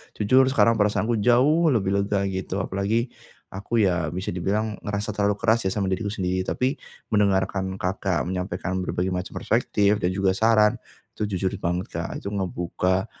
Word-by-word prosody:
Jujur, 130 Hz, +6 st, +4 dB
sekarang 115 Hz, -4 st, +3 dB
perasaanku 105 Hz, +2 st, +1 dB
jauh 145 Hz, +8 st, +4 dB
lebih 95 Hz, -4 st, 0 dB
lega, 100 Hz, 0 st, 0 dB
gitu. 95 Hz, 0 st, -4 dB
Apalagi 105 Hz, +6 st, -1 dB, 0.4 s
aku, 105 Hz, +3 st, 0 dB
ya, 90 Hz, -4 st, 0 dB
bisa 95 Hz, +1 st, -3 dB
dibilang 105 Hz, +4 st, -1 dB
ngerasa 105 Hz, +1 st, -3 dB
terlalu 105 Hz, 0 st, +1 dB
keras, 115 Hz, 0 st, +3 dB
ya, -, -, +2 dB
sama 100 Hz, -2 st, 0 dB
diriku 100 Hz, +3 st, -1 dB
sendiri. 95 Hz, -2 st, -1 dB
Tapi, 130 Hz, -, 0 dB, 0.4 s
mendengarkan 95 Hz, -2 st, +1 dB
Kakak 95 Hz, -1 st, -1 dB
menyampaikan 95 Hz, 0 st, -3 dB
berbagai 90 Hz, +1 st, -2 dB
macam 90 Hz, 0 st, -4 dB
perspektif 105 Hz, 0 st, +1 dB
dan 90 Hz, -, +1 dB
juga 95 Hz, -1 st, +2 dB
saran, 110 Hz, +1 st, +4 dB, 0.4 s
itu, -, -, -4 dB
jujur 95 Hz, +1 st, -1 dB
banget, 90 Hz, +1 st, -1 dB
Kak, -, -, -3 dB
itu -, -, -3 dB
ngebuka 95 Hz, -1 st, -1 dB
100 Hz, 160 wpm, -24 LUFS, 95-110 Hz, 0.4 s, Jujur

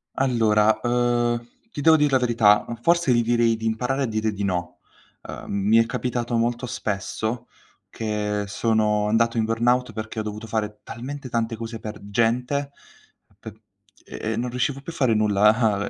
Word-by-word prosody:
Allora, 110 Hz, -5 st, +3 dB
uhm, 120 Hz, -1 st, +1 dB, 0.3 s
ti -, -, -7 dB
devo 160 Hz, +2 st, +6 dB
dir 150 Hz, -2 st, +2 dB
la 130 Hz, -, +5 dB
verità, 115 Hz, -4 st, +4 dB, 0.2 s
forse 170 Hz, -4 st, +3 dB
gli 120 Hz, -1 st, +3 dB
direi 115 Hz, -1 st, +2 dB
di 110 Hz, 0 st, -7 dB
imparare 125 Hz, +5 st, -1 dB
a -, -, +1 dB
dire 110 Hz, -2 st, -1 dB
di 100 Hz, 0 st, -4 dB
no. 90 Hz, -2 st, -3 dB, 0.4 s
Ehm, -, -, -9 dB, 0.2 s
mi 110 Hz, -, +6 dB
è 115 Hz, -, +5 dB
capitato 120 Hz, 0 st, -2 dB
molto 120 Hz, +2 st, 0 dB
spesso 110 Hz, +2 st, -3 dB, 0.4 s
che 105 Hz, -2 st, -2 dB
sono 105 Hz, 0 st, +1 dB
andato 115 Hz, +2 st, +2 dB
in 110 Hz, -, +2 dB
burnout 120 Hz, +2 st, +1 dB
perché 110 Hz, 0 st, -5 dB
ho -, -, 0 dB
dovuto 105 Hz, +1 st, -6 dB
fare 105 Hz, -1 st, -3 dB
talmente 130 Hz, +2 st, -7 dB
tante 115 Hz, 0 st, -1 dB
cose 115 Hz, 0 st, -6 dB
per 105 Hz, -1 st, -7 dB
gente 125 Hz, +6 st, 0 dB, 0.7 s
p 110 Hz, -, -9 dB, 0.5 s
ehm, 110 Hz, +1 st, -4 dB
non 125 Hz, +1 st, -2 dB
riuscivo 130 Hz, +3 st, -2 dB
più 170 Hz, -, -7 dB
a 165 Hz, -, -12 dB
fare 130 Hz, -5 st, +2 dB
nulla 105 Hz, 0 st, +2 dB
115 Hz, 165 wpm, -23 LUFS, 110-125 Hz, 0.7 s, devo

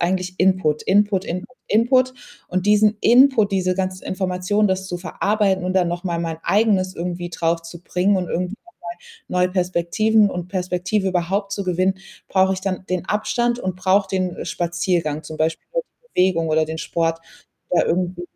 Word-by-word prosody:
eigentlich 185 Hz, +1 st, -1 dB
Input, 185 Hz, -5 st, +2 dB
Input, 200 Hz, -1 st, +2 dB
Input, 180 Hz, +8 st, -5 dB
Input. 255 Hz, +4 st, +3 dB, 0.3 s
Und 185 Hz, +2 st, -2 dB
diesen 210 Hz, +1 st, +4 dB
Input, 245 Hz, -4 st, +5 dB
diese 185 Hz, -1 st, +1 dB
ganzen 185 Hz, -1 st, -2 dB
Informationen, 185 Hz, +2 st, 0 dB
das 190 Hz, 0 st, -1 dB
zu 180 Hz, -, -3 dB
verarbeiten 195 Hz, +1 st, 0 dB
und 185 Hz, +1 st, -2 dB
dann 185 Hz, -2 st, +3 dB
noch 175 Hz, +1 st, -3 dB
mal 175 Hz, -3 st, -2 dB
mein 165 Hz, -1 st, -3 dB
Eigenes 195 Hz, -3 st, +2 dB
irgendwie 175 Hz, 0 st, -4 dB
draufzubringen 170 Hz, +3 st, -1 dB
und 185 Hz, -1 st, -1 dB
irgendwie 180 Hz, +3 st, -2 dB
noch 355 Hz, -, -19 dB, 0.6 s
mal 180 Hz, -, +1 dB
neue -, -, +1 dB
Perspektiven 195 Hz, +4 st, +2 dB
und 180 Hz, -2 st, -5 dB
Perspektive 185 Hz, +2 st, -1 dB
überhaupt 190 Hz, +2 st, -1 dB
zu 200 Hz, -, -2 dB
gewinnen, 185 Hz, +1 st, +1 dB, 0.3 s
brauche 190 Hz, 0 st, +3 dB
ich 190 Hz, -, -6 dB
dann 190 Hz, -1 st, -3 dB
den 185 Hz, -1 st, -1 dB
Abstand 240 Hz, +4 st, 0 dB
und 185 Hz, -4 st, -3 dB
brauche 190 Hz, +2 st, +2 dB
den 185 Hz, -2 st, -2 dB
Spaziergang, 170 Hz, -3 st, -1 dB
zum 155 Hz, 0 st, -8 dB
Beispiel 160 Hz, +1 st, -1 dB
über -, -, -1 dB
die 485 Hz, 0 st, -35 dB, 0.2 s
Bewegung 165 Hz, -3 st, 0 dB
oder 155 Hz, 0 st, +2 dB
den 160 Hz, +1 st, -6 dB
Sport, 165 Hz, +1 st, -1 dB, 0.5 s
da 180 Hz, -, +3 dB
irgendwie. 175 Hz, 0 st, -1 dB
185 Hz, 170 wpm, -21 LUFS, 175-200 Hz, 0.6 s, Input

